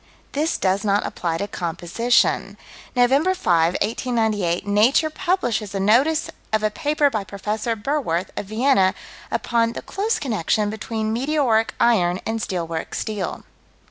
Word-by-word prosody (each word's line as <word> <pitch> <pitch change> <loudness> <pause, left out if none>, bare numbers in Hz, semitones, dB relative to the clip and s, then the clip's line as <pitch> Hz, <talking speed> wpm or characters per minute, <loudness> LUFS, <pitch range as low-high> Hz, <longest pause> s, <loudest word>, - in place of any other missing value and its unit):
This 305 +3 0
does 190 +1 +1
not 205 0 +1
apply 165 -2 -2
to 200 - -3
composition. 180 +7 0 0.4
Nov. 245 0 +4
5, 270 - +6 0.7
1898, 215 -6 0
Nature 225 +10 +3
publishes 240 - -1
a - - -1
notice 255 +11 +3 0.2
of 215 0 +1
a 215 - +2
paper 295 +2 +1
by 215 -4 -2
Prof. 195 +1 -11 0.4
Berwerth, 200 - -1
of 200 - -5
Vienna, 215 -4 +3 0.3
upon 230 -1 0
"the - - -7
close 420 +4 -1
connection 215 - 0
between 220 0 -3
meteoric 250 -3 +1
iron 185 -7 +3
and 225 0 -2
steel 180 -4 -2
works' 165 -1 -5
steel." 210 -4 -4
220 Hz, 140 wpm, -22 LUFS, 195-255 Hz, 0.7 s, 5